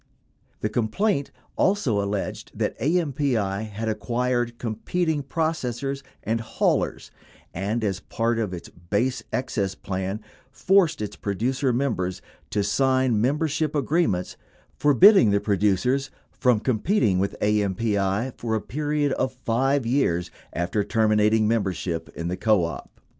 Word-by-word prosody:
The 105 - 0
complaint 140 - 0 0.3
also 145 - +2
alleged 100 0 -4
that - - -1
AMPI 135 - 0
had 110 +2 -4
acquired 120 +2 -1
competing 150 +8 -1
processors 140 -3 -2 0.2
and 115 +1 -1
haulers 110 - -1 0.4
and, 105 +6 -2
as 95 -3 -1
part 115 +3 -1
of 105 -5 -1
its 85 -2 -7
base 105 +9 -1
excess 110 -6 -1
plan, 95 +2 -3 0.3
forced 170 - +2
its 105 0 -5
producer 125 +7 -1
members 115 -8 -1 0.3
to 105 - 0
sign 130 +1 +2
membership 150 +4 0
agreements 140 - 0 0.4
forbid 145 +8 +7
ding 190 - +5
the 100 0 +3
producers 105 +7 +1 0.2
from 125 -4 +2
competing 115 - +1
with 100 +1 -2
AMPI 105 +2 0
for 115 -2 -1
a - - +1
period 150 +1 -1
of 130 0 0
5 130 +2 0
years 95 -9 +1 0.2
after 90 +4 -1
terminating 110 0 +3
membership 95 -6 -1
in 85 - -4
the 90 +1 -2
co 110 -5 +3
op. 85 - -7
115 Hz, 125 wpm, -24 LUFS, 100-135 Hz, 0.4 s, forbid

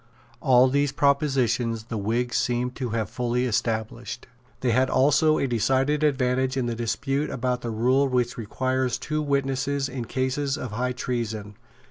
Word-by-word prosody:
All 130 -1 +5
these 140 +1 +1
propositions 135 -5 +1
the 115 0 -5
Whigs 120 +4 -1
seem 125 0 0
to 125 -1 -4
have 110 -1 -1
fully 125 0 -1
established. 115 +1 -2 0.4
They 125 - +2
had 130 +3 +2
also 150 +3 +4
a - - +1
decided 135 +5 +1
advantage 130 -2 +1
in 130 - 0
the 120 - -1
dispute 135 +5 -1
about 125 -1 -1
the 120 - -4
rule 125 +5 +2
which 125 -2 0
requires 130 +3 -1
two 155 0 -2
witnesses 140 -1 0
in 125 -3 -5
cases 130 +4 -1
of 125 -6 -5
high 125 +4 -1
treason. 110 -5 -4
125 Hz, 155 wpm, -25 LUFS, 120-135 Hz, 0.4 s, All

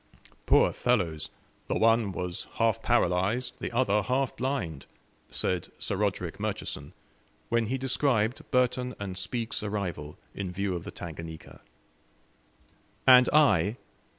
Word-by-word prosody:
"Poor - - +5
fellows! 90 -11 0 0.4
The - - -1
one 115 -2 +3
was 90 -1 -4
half 115 -1 +2
paralyzed, 110 +2 +1
the - - -4
other 105 -4 +2
half 130 +5 0
blind," 100 - -3 0.4
said 90 -2 -1
Sir - - -2
Roderick - - -2
Murchison, - - -4 0.6
when 115 -1 +1
he 130 +4 -1
described 130 -3 +1
Burton 125 0 +1
and 100 -2 -4
Spoke's 110 +5 -3
arrival 90 -8 -4 0.2
in 95 -3 -4
view 100 +1 -1
of 85 - -6
the - - -6
Tanganika. 80 -1 -9 1.4
And 125 -1 +8
I? 110 - +4
105 Hz, 125 wpm, -28 LUFS, 90-125 Hz, 1.4 s, And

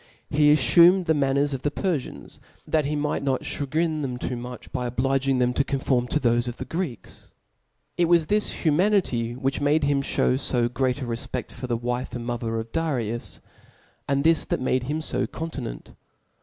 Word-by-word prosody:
He 150 0 +5
aflumed 170 +7 +6
der. 160 -2 +2
the 150 - -1
manners 140 +1 +2
of 130 - -3
the 145 - 0
Perfians, 155 -3 -4 0.3
that 155 -2 +1
he 150 +2 -1
might 150 0 -1
not 135 -2 -1
cha 145 - -2
grine 155 +2 0
them 130 -3 -3
too 125 - -3
much 125 +1 -8
by 125 -2 -2
obliging 135 +2 +1
them 125 0 +2
to 140 - +2
conform 130 -3 0
to 150 - 0
thofe 120 -2 +2
of 120 - -5
the 130 - -5
Greeks. 155 - -6 0.7
It 175 - +3
was 170 -1 +4
this 210 +5 0
humanity 155 - +2
whkrh 135 +3 -2
made 145 +2 +2
him 140 -1 +2
/hew 130 -1 +1
fo 120 -2 +1
great 130 +1 -1
a - - -3
refpedk 115 -1 -4
for 125 - -7
the 120 -1 0
wife 120 +2 -3
and 120 -1 -5
iriother 115 -2 -2
of 115 0 -7
Darius; 120 -8 -2 0.7
and 140 0 +1
this 165 0 +4
that - - -1
made 130 0 0
him 155 +4 -2
(o - - 0
continent. 160 - -6
135 Hz, 195 wpm, -25 LUFS, 125-150 Hz, 0.7 s, aflumed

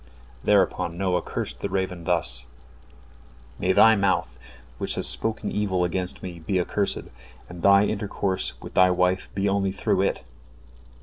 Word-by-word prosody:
" - - -25
Thereupon 85 0 +2
Noah 90 -1 0
cursed - - -5
the - - -3
raven 90 -3 -3
thus: 75 -8 +2 1.1
"May 95 -1 +1
thy 110 +4 +6
mouth, 95 - 0 0.4
which - - -2
has - - -2
spoken 110 -2 -1
evil 95 -4 0
against 90 +1 -2
me, 90 -2 -7
be 90 +4 -1
accursed, 100 +3 -1 0.4
and 90 -1 -10
thy 100 +2 +6
intercourse 100 -2 -2
with - - -9
thy 90 0 +5
wife 90 +1 +1
be 100 0 0
only 100 -1 +1
through 95 0 0
it." 100 - -1
95 Hz, 150 wpm, -25 LUFS, 90-100 Hz, 1.1 s, thy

